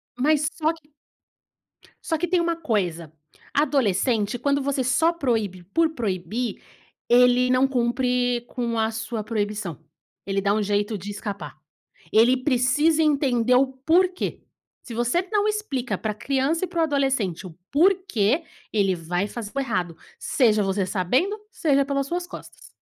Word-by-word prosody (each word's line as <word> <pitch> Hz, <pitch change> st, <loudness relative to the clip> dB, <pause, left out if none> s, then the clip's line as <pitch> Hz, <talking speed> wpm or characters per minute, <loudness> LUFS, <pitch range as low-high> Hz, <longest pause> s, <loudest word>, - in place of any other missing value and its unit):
Mas 295 Hz, +3 st, +2 dB
só 315 Hz, 0 st, +1 dB
que 315 Hz, -2 st, -19 dB, 1.1 s
só 320 Hz, -, -1 dB
que 350 Hz, +3 st, -1 dB
tem 355 Hz, +1 st, +2 dB
uma 335 Hz, 0 st, 0 dB
coisa, 180 Hz, -, -2 dB, 0.4 s
adolescente 240 Hz, -6 st, +1 dB
quando 280 Hz, +1 st, +1 dB
você 275 Hz, -1 st, -1 dB
só 320 Hz, +7 st, +2 dB
proíbe 220 Hz, -, -1 dB
por 315 Hz, -, +1 dB
proibir, 215 Hz, -, -3 dB, 0.5 s
ele 250 Hz, +1 st, +5 dB
não 255 Hz, +1 st, +4 dB
cumpre 245 Hz, -1 st, 0 dB
com 235 Hz, -2 st, -3 dB
a 220 Hz, 0 st, +1 dB
sua 220 Hz, 0 st, -4 dB
proibição. 205 Hz, -6 st, -3 dB, 0.5 s
Ele 195 Hz, 0 st, -1 dB
dá 200 Hz, +1 st, +2 dB
um 215 Hz, -, +1 dB
jeito 205 Hz, +1 st, 0 dB
de 200 Hz, +2 st, -8 dB
escapar. 200 Hz, -8 st, -6 dB, 0.5 s
Ele 235 Hz, +4 st, +5 dB
precisa 285 Hz, +4 st, +2 dB
entender 255 Hz, -5 st, +2 dB
o 265 Hz, +2 st, +4 dB
porquê. 335 Hz, +8 st, 0 dB, 0.4 s
Se 240 Hz, -, -9 dB
você 245 Hz, +11 st, 0 dB
não 420 Hz, -1 st, +2 dB
explica 420 Hz, -, -2 dB
para 215 Hz, -1 st, -3 dB
criança 275 Hz, -, -1 dB
e -, -, -10 dB
para 345 Hz, -1 st, -4 dB
o -, -, +4 dB
adolescente 270 Hz, -, 0 dB
o 170 Hz, -3 st, -11 dB
porquê, 325 Hz, -, +2 dB, 0.3 s
ele 195 Hz, -3 st, +2 dB
vai 175 Hz, +3 st, -2 dB
fazer 210 Hz, -1 st, -7 dB
o 275 Hz, -, -1 dB
errado, 185 Hz, -10 st, -2 dB, 0.2 s
seja 220 Hz, -6 st, +2 dB
você 195 Hz, 0 st, 0 dB
sabendo, 250 Hz, -, 0 dB
seja 280 Hz, -9 st, +2 dB
pelas 275 Hz, 0 st, -2 dB
suas 350 Hz, +3 st, -2 dB
costas. 355 Hz, -, -12 dB
250 Hz, 150 wpm, -24 LUFS, 210-290 Hz, 1.1 s, ele